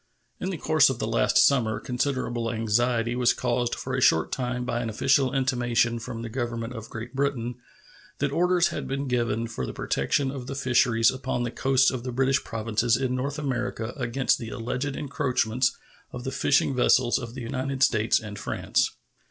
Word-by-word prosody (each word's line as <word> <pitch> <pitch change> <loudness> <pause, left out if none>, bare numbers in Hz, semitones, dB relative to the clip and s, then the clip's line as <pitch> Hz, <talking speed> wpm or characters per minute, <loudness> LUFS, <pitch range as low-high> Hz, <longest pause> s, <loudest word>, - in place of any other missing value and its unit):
In - - -3
the - - -3
course - - +4
of - - -2
the - - -2
last - - +2
summer 115 -6 +4
considerable 125 -3 -2
anxiety 115 +1 +1
was 125 -1 +3
caused 120 -1 -1
for 130 - -5
a 130 - 0
short 80 -9 +3
time 125 -1 -2
by 120 -1 -1
an 115 - -3
official 135 +4 +2
intimation 120 -3 +1
from 115 0 -6
the - - -4
Government 120 -1 -3
of 115 -2 -8
Great 115 +1 -7
Britain 130 -3 -2 0.6
that 140 0 -1
orders 175 +2 +3
had - - -5
been 135 +1 -3
given 115 -2 0
for 115 - -5
the - - -4
protection 130 - 0
of 130 -3 -7
the 135 - -5
fisheries 120 -4 +3
upon 130 -2 -3
the 120 - -2
coasts 130 0 +3
of 125 -2 -5
the 125 - -4
British 135 +2 +1
provinces 115 0 0
in 130 -1 -1
North 135 +3 -2
America 125 -4 -3
against 130 0 0
the 115 - -6
alleged 125 +5 -3
encroachments 130 -4 0 0.3
of 125 - -7
the 130 - -3
fishing 140 -1 +2
vessels 125 -1 +3
of 120 -1 -8
the 130 - -6
United 130 +2 -2
States 110 -2 +3
and 105 -2 -8
France. - - 0
125 Hz, 185 wpm, -26 LUFS, 115-135 Hz, 0.6 s, course